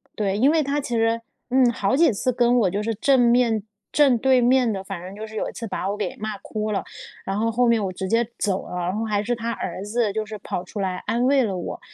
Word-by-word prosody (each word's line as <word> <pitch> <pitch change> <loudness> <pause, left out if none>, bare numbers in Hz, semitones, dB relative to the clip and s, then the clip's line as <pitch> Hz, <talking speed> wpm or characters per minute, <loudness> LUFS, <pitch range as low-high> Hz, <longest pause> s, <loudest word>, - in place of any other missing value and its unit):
对， 200 -2 -1
因 270 +6 +4
为 320 -1 +3
她 285 +1 -1
其 275 - -6
实， 225 0 +1 0.3
嗯， 255 -1 +4
好 205 +2 0
几 325 -3 +5
次 255 +5 0
跟 245 0 +3
我 190 - +3
就 205 +3 -2
是 225 +1 -1
正 270 +4 +3
面 235 -3 +3 0.3
正 275 -5 +4
对 260 +2 +4
面 245 -1 +3
地 195 -2 -3
反 195 -3 -6
正 185 +2 -8
就 215 +1 -6
是 220 - -11
有 - - -2
一 - - -8
次 230 - -6
把 195 - -3
我 205 - -1
给 210 - -3
骂 215 -1 -4
哭 215 -1 -4
了， 195 - 0 0.4
然 195 +1 -2
后 230 +1 +1
后 245 +2 +2
面 230 -3 +3
我 190 - -2
直 190 +1 -4
接 230 +2 +2
走 195 -2 -1
了， - - -6
然 180 +2 -2
后 225 - -1
还 205 -2 0
是 240 +2 -1
她 230 0 -3
儿 190 -4 -5
子 215 0 0
就 220 0 -2
是 215 0 -7
跑 180 - -4
出 205 - -8
来 185 -1 -1
安 240 +2 +1
慰 270 0 +4
了 195 -4 -2
我， 175 - -5
225 Hz, 290 characters per minute, -23 LUFS, 200-245 Hz, 0.4 s, 几